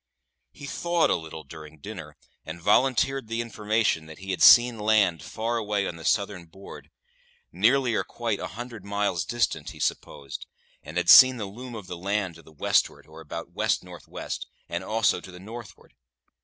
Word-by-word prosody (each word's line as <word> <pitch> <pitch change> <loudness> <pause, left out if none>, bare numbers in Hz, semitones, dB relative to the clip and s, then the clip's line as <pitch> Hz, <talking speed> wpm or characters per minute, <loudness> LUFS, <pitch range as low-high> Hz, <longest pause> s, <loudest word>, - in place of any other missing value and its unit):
He 145 - -11
thawed 170 +3 +1
a - - +3
little 80 -1 -7
during 75 +1 -12
dinner, 75 - -9 0.3
and 80 +2 -8
volunteered 130 +6 +2
the 115 +1 -3
information 110 -7 0
that 80 - -11
he 95 +1 -6
had 90 - -3
seen 120 -2 +8
land 105 -6 +3
far 115 +8 -3
away 105 -2 -1
on 85 - -6
the 80 - -11
southern 100 -4 0
board 95 +4 -12 0.6
nearly 135 -3 +3
or - - +1
quite 115 -4 -3
a - - -4
hundred 120 -3 -8
miles 100 -4 -1
distant, 85 -9 -1
he 80 - -11
supposed 70 -1 -4 0.3
and 75 +4 -8
had 90 - 0
seen 130 -1 +9
the 110 - -4
loom 120 +5 -9
of 105 -4 -8
land 95 +1 -2
to 85 - -14
the 80 - -18
westward, 75 - 0
or 80 +1 -13
about 85 +2 -7
west - - 0
north - - -12
west, - - -6 0.2
and - - -4
also 110 -4 +1
to - - -12
the 90 - -11
northward. 110 +1 -11
100 Hz, 185 wpm, -26 LUFS, 85-115 Hz, 0.6 s, seen